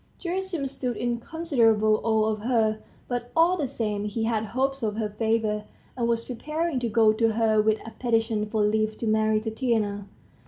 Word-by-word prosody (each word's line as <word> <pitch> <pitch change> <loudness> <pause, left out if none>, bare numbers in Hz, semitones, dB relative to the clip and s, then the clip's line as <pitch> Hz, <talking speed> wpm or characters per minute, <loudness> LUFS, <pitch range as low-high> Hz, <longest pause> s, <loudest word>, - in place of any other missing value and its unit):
Gerasim 365 -4 -3
stood 250 -3 -3
in 240 -1 -1
considerable 230 -9 +2
awe 220 -1 +2
of 215 -1 -1
her, 220 -1 +1 0.3
but, 245 -1 -3
all 335 +3 +5
the 300 -6 -1
same, 210 -5 -2
he 210 +2 -2
had 220 -1 0
hopes 265 +4 -1
of 215 -2 -1
her 215 -1 -2
favor, 215 0 0 0.3
and 240 -2 0
was 230 0 0
preparing 305 +4 -2
to 240 -1 -2
go 220 0 +4
to 225 0 +2
her 220 -1 +3
with 215 0 +2
a 225 - -7
petition 225 -3 0
for 215 0 0
leave 215 +1 +1
to - - -4
marry 215 0 +2
Tatiana. 220 -3 -1
225 Hz, 185 wpm, -26 LUFS, 215-245 Hz, 0.3 s, all